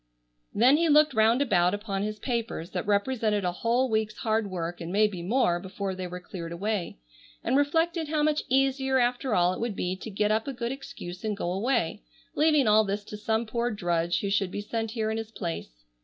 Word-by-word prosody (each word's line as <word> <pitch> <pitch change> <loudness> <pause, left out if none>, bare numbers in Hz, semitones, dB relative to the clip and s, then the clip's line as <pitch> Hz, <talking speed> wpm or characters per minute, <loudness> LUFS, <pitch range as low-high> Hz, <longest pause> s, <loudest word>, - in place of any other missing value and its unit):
Then 255 +7 +5
he 335 0 +2
looked 300 0 +5
round 225 +4 +4
about 180 -6 +2
upon 205 -2 -3
his 210 +1 -3
papers 230 -7 -3
that - - -3
represented 210 -1 +1
a 180 - +1
whole 235 +8 +1
week's 220 -2 -1
hard 220 -2 0
work 175 -1 -4
and 170 +1 -5
maybe 205 -2 +2
more 180 -2 +2
before 195 +1 -4
they 185 -1 -5
were 180 +1 -6
cleared 170 -2 -7
away, 195 - -2 0.5
and 250 - +1
reflected 325 +3 +1
how 300 0 0
much 305 0 +2
easier 265 0 +2
after 245 -1 +1
all 180 0 +3
it - - -6
would 230 -3 -2
be 180 0 -2
to 220 - -8
get 210 +1 0
up 220 +3 0
a 275 - -3
good 240 -1 -3
excuse 185 -9 -8
and 215 -2 -2
go 175 - -2
away, 220 - 0 0.3
leaving 300 -3 +3
all 215 +1 +6
this 205 0 -3
to 210 - -8
some 220 +2 -1
poor 235 +2 -1
drudge 175 -5 0
who 200 - -2
should 200 -2 +1
be 200 - -5
sent 225 +1 -3
here 220 -1 -2
in 220 - -2
his 225 -1 -6
place. 165 - -6
215 Hz, 215 wpm, -27 LUFS, 185-245 Hz, 0.5 s, all